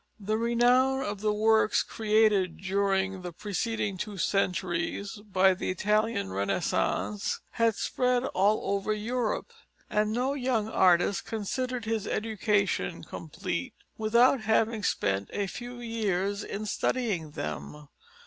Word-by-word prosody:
The 215 +2 -1
renown 250 +3 +3
of 205 -4 -4
the 215 0 +2
works 220 +1 +3
created 210 -4 +2
during 195 0 0
the 180 -1 -6
preceding 205 +1 -2
two 205 +1 -5
centuries 190 +2 -1
by 190 0 +5
the 185 - -4
Italian 210 - 0
Renaissance 100 - -1
had 230 -2 +2
spread 250 +2 +1
all 200 -2 +1
over 200 +2 0
Europe, 235 - -2 0.4
and 210 0 +1
no 250 +4 0
young 250 -6 0
artist 185 -2 +3
considered 240 +3 -3
his 220 -2 -1
education 210 -2 0
complete - - -5 0.2
without 235 +4 +4
having 220 +1 +1
spent 100 - 0
a 205 - 0
few 245 +5 -7
years 205 -4 -1
in 210 +2 -5
studying 210 -7 -1
them. 75 - -5
210 Hz, 120 wpm, -28 LUFS, 195-230 Hz, 0.4 s, by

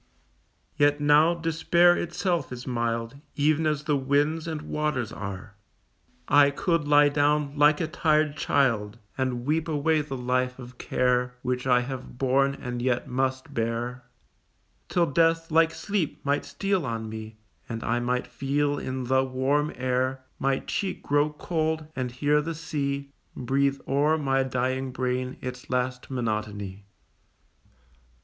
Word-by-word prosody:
Yet 145 0 +3
now 150 +3 +5
despair 170 +1 +3
itself 175 -1 -1
is 125 0 -7
mild, 115 0 -2 0.2
Even 155 +2 +2
as 150 -1 0
the 150 -1 +1
winds 145 +4 +1
and 155 -2 -4
waters 150 -8 -2
are; 100 +2 -7 0.7
I 145 -1 +6
could 165 +1 0
lie 145 0 +6
down 145 0 +1
like 150 0 +5
a - - 0
tired 155 -2 +1
child, 115 -9 +1 0.2
And 130 -2 -2
weep 155 +3 0
away 155 0 +1
the 140 -2 -5
life 125 0 0
of 125 -1 -11
care 125 0 +1
Which 125 0 -2
I 125 -1 +4
have 130 -1 -7
born 135 +1 +2
and 125 -2 -4
yet 125 -1 0
must 130 +1 -2
bear, 115 +2 -2 0.9
Till 175 -1 +3
death 165 +2 +2
like 160 +1 +5
sleep 185 -3 -3
might 145 +1 +1
steal 190 +5 -1
on 115 -4 -3
me, 110 0 -8 0.3
And 115 -1 -4
I 120 +1 0
might 125 +1 -1
feel 145 +1 -1
in 130 0 -4
the 130 +1 +2
warm 135 +3 0
air 130 +1 -1 0.2
My 135 0 +1
cheek 195 - -3
grow 145 +1 +2
cold, 160 0 -2
and 130 -1 -2
hear 145 +4 +2
the 165 +2 -4
sea 140 -3 -3 0.2
Breathe 140 +2 0
o'er 145 +3 +2
my 135 -3 +1
dying 130 0 -1
brain 125 0 -2
its 125 +2 -7
last 125 0 -2
monotony. 105 -5 -3
135 Hz, 145 wpm, -26 LUFS, 125-150 Hz, 0.9 s, I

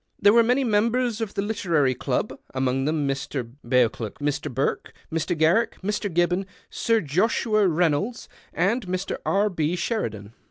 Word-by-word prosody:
There 205 - +6
were 235 - +7
many 250 +4 +2
members 230 +1 +1
of 220 -3 -4
the 200 - 0
Literary 170 -11 +1
Club, 125 - -2 0.2
among 130 0 0
them 150 -1 0
Mr. 135 -3 -3
Beauclerk, 120 -3 +1
Mr. 145 0 -2
Burke, 130 +3 -2 0.2
Mr. 165 +1 -1
Garriek, 170 +9 +2
Mr. 205 0 -2
Gibbon, 175 +3 +1 0.2
Sir 230 -1 +1
Joshiui 210 +6 +2
Rey 170 +1 +3
nolds, 200 +12 -3 0.2
and 195 +6 0
Mr. 185 +1 -2
R. 200 +2 +3
B. 160 -1 0
Sheridan. 115 - -3
180 Hz, 155 wpm, -24 LUFS, 145-215 Hz, 0.2 s, were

